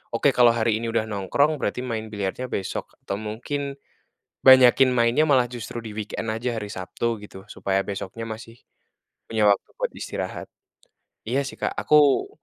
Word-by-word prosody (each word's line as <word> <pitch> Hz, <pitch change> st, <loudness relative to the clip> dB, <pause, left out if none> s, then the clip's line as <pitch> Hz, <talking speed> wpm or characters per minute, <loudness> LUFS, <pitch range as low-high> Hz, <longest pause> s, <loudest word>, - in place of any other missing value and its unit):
"Oke, -, -, +3 dB
kalau 120 Hz, -1 st, +6 dB
hari 110 Hz, -1 st, +1 dB
ini 115 Hz, -, -4 dB
udah 115 Hz, -, +1 dB
nongkrong, 110 Hz, -, +1 dB
berarti 125 Hz, -, -2 dB
main 115 Hz, -3 st, -4 dB
biliarnya 105 Hz, +4 st, -3 dB
besok, 95 Hz, -, -4 dB
atau 100 Hz, -, -3 dB
mungkin, 135 Hz, +6 st, -4 dB, 0.7 s
banyakin 130 Hz, 0 st, +7 dB
mainnya 120 Hz, +4 st, +3 dB
malah 130 Hz, -5 st, +4 dB
justru 120 Hz, -1 st, -6 dB
di 110 Hz, -2 st, -7 dB
weekend 105 Hz, +1 st, -5 dB
aja, 115 Hz, +1 st, -2 dB
hari 105 Hz, -1 st, -6 dB
Sabtu." 105 Hz, +5 st, -3 dB
gitu, 95 Hz, -1 st, -12 dB
supaya 95 Hz, 0 st, -1 dB
besoknya 100 Hz, +3 st, -5 dB
masih 115 Hz, +1 st, -9 dB, 0.7 s
punya 110 Hz, -2 st, +2 dB
waktu 100 Hz, -, 0 dB
buat -, -, -1 dB
istirahat. -, -, -5 dB, 0.8 s
Iya 130 Hz, +5 st, +1 dB
sih, -, -, -9 dB
Kak, -, -, -1 dB
aku, 150 Hz, -, +4 dB
115 Hz, 160 wpm, -24 LUFS, 105-125 Hz, 0.8 s, banyakin